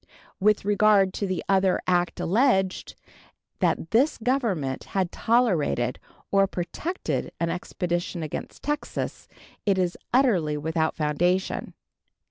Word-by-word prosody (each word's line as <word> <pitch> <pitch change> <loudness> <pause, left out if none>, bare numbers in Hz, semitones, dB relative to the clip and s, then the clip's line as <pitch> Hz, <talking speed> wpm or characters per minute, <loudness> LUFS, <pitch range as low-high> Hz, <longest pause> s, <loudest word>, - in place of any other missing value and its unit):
With 210 0 +3
regard 205 -2 +4
to 200 - -2
the 185 -2 -2
other 190 -1 +3
act 175 -1 +1
alleged, 190 -2 +1 0.6
that 165 - 0
this 260 +7 +3
Government 220 - -1
had 185 -3 +1
tolerated 175 - +1 0.3
or 195 0 +4
protected 190 - -3
an 170 0 0
expedition 175 -1 -3
against 155 - -6
Texas, 295 +1 -3 0.4
it 200 -2 +2
is 180 -2 0
utterly 190 - +3
without 160 +1 -1
foundation. 175 +5 0
185 Hz, 110 wpm, -25 LUFS, 170-215 Hz, 0.6 s, regard